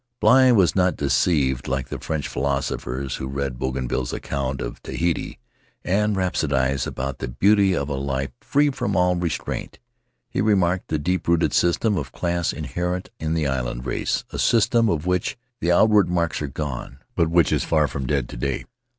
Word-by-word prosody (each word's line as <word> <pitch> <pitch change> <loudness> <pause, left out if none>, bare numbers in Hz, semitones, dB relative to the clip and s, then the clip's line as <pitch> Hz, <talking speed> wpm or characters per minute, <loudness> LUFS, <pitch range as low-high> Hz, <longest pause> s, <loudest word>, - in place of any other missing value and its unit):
Bligh 130 0 +6
was 95 -6 +4
not 90 -1 +3
deceived, 65 -1 +1
like 65 -1 -2
the - - -5
French 75 -2 -3
philosophers 70 -1 -2
who 65 - -4
read 70 -2 -3
Bougainville's 65 -1 -2
account 70 -1 -3
of - - -5
Tahiti, 85 -1 -2 0.5
and 105 +3 +1
rhapsodized 70 -8 0
about 70 0 -4
the - - -3
beauty 95 - +3
of 70 -3 -1
a 75 - -3
life 70 0 -2
free 145 0 +2
from 100 -6 -2
all 90 0 +3
restraint; 85 -3 -3 0.5
he - - -2
remarked 95 -4 +2
the 80 - 0
deep 90 +5 -1
rooted 85 0 +2
system 95 +4 +2
of 65 -3 -6
class 85 +2 -1
inherent 90 +1 -3
in 80 +1 -1
the 80 -2 0
island 60 -2 -2
race, - - -1
a - - -5
system 115 0 +3
of 80 -1 -1
which 90 +7 0 0.2
the 85 - +1
outward 105 +2 +5
marks 85 -3 0
are 75 - -2
gone, 65 -2 -5 0.2
but 85 -7 +1
which 85 0 +3
is - - +1
far 75 -2 +2
from 65 0 -4
dead 70 -3 0
to - - -8
day. 70 +2 -2
80 Hz, 175 wpm, -23 LUFS, 65-90 Hz, 0.5 s, Bligh